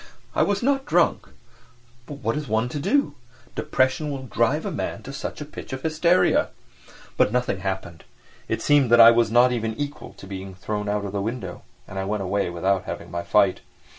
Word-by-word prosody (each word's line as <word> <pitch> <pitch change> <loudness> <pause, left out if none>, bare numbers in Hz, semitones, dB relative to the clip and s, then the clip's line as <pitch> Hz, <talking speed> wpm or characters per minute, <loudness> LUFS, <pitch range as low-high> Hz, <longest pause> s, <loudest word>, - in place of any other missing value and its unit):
I - - +1
was 205 +2 +1
not 270 +1 +1
drunk—but 120 -6 -3
what 115 - 0
is 150 -1 -4
one 110 +2 0
to 145 - -4
do—depression 130 - -1
will 135 -2 -5
drive 120 - 0
a - - -2
man - - -4
to - - -8
such - - -6
a - - -4
pitch - - -9
of 130 - -5
hysteria? 165 +3 +3 0.7
But - - +3
nothing 125 -5 0
happened. 95 -3 -5 0.4
It - - -2
seemed 145 -4 +4
that 120 0 +6
I 115 0 +10
was 115 -1 +3
not 120 +2 +5
even 115 -2 -2
equal 145 +3 -6
to - - -13
being 95 -1 -7
thrown 105 +3 -4
out 105 0 -1
of 100 - -4
the 100 0 -2
window 105 -4 -5 0.3
and 95 - -6
I 95 - -2
went 105 0 -2
away 100 0 0
without 95 +2 0
having - - -6
my 85 - -3
fight. 100 +1 +3
115 Hz, 195 wpm, -24 LUFS, 100-130 Hz, 0.7 s, I